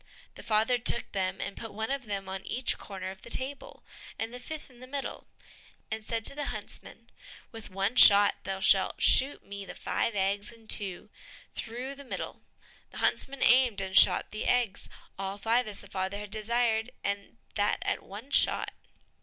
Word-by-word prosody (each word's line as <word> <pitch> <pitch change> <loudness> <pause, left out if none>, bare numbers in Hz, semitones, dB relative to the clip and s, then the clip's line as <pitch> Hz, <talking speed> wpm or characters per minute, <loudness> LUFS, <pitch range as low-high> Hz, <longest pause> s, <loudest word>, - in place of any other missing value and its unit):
The - - -11
father 225 +3 +2
took 235 0 +1
them, 190 -1 -1
and - - -4
put 225 -2 -7
one 220 +3 -3
of 275 -2 -2
them 200 -2 -3
on 190 0 -5
each 255 0 0
corner 190 -2 -6
of 190 - -13
the - - -10
table, 280 - -2 0.3
and 225 +1 -4
the 250 - -7
fifth 310 +4 -7
in 245 - -18
the 255 - -11
middle, 275 +1 -5 0.6
and 220 0 -3
said 225 0 -3
to - - +5
the 290 0 -4
huntsman, - - -9 0.4
"With 225 -2 -9
one 195 +4 -1
shot 205 -3 +8
thou 195 0 -4
shalt 190 0 +4
shoot 275 +2 +4
me 200 0 -7
the - - -9
five 230 - -1
eggs 200 +2 0
in 225 -1 -18
two, 200 0 -1 0.4
through 245 +4 -5
the 280 0 -11
middle." 260 - -6 0.5
The - - -12
huntsman 275 0 +1
aimed, 245 -4 +5
and 190 -1 -3
shot - - +6
the 215 - -4
eggs, 240 -5 +1 0.3
all 195 0 -3
five 230 +3 +1
as 205 -2 -6
the 200 - -12
father 190 0 -3
had 205 -1 -7
desired, 225 +1 0
and 200 +3 -3 0.2
that 205 0 +1
at - - -1
one 215 +8 -10
shot. - - +4
220 Hz, 185 wpm, -29 LUFS, 200-245 Hz, 0.6 s, shot